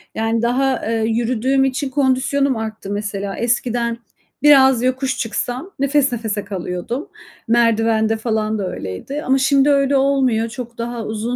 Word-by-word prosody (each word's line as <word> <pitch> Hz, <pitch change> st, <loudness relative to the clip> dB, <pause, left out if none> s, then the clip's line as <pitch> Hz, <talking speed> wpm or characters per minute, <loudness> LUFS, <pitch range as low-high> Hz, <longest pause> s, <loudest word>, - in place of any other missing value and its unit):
Yani 225 Hz, +1 st, 0 dB
daha, 255 Hz, +2 st, 0 dB
eee, 225 Hz, -1 st, 0 dB
yürüdüğüm 240 Hz, +3 st, +1 dB
için 265 Hz, +1 st, -2 dB
kondisyonum 270 Hz, 0 st, +1 dB
arttı 220 Hz, -2 st, -6 dB
mesela. 200 Hz, -1 st, -4 dB
Eskiden 235 Hz, 0 st, 0 dB, 0.5 s
biraz 265 Hz, -4 st, +6 dB
yokuş 260 Hz, +1 st, 0 dB
çıksam 245 Hz, -, -3 dB
nefes 280 Hz, -1 st, +2 dB
nefese 220 Hz, -4 st, -3 dB
kalıyordum. 200 Hz, -, -5 dB, 0.4 s
Merdivende 225 Hz, -1 st, +2 dB
falan 220 Hz, -1 st, -1 dB
da 190 Hz, -3 st, -3 dB
öyleydi 185 Hz, -, -6 dB
ama 265 Hz, +1 st, +2 dB
şimdi 275 Hz, +1 st, +3 dB
öyle 280 Hz, -1 st, +3 dB
olmuyor. 260 Hz, -5 st, +1 dB
Çok 240 Hz, -1 st, -8 dB
daha 235 Hz, -1 st, -4 dB
uzun 220 Hz, +3 st, -3 dB
240 Hz, 135 wpm, -19 LUFS, 220-270 Hz, 0.5 s, biraz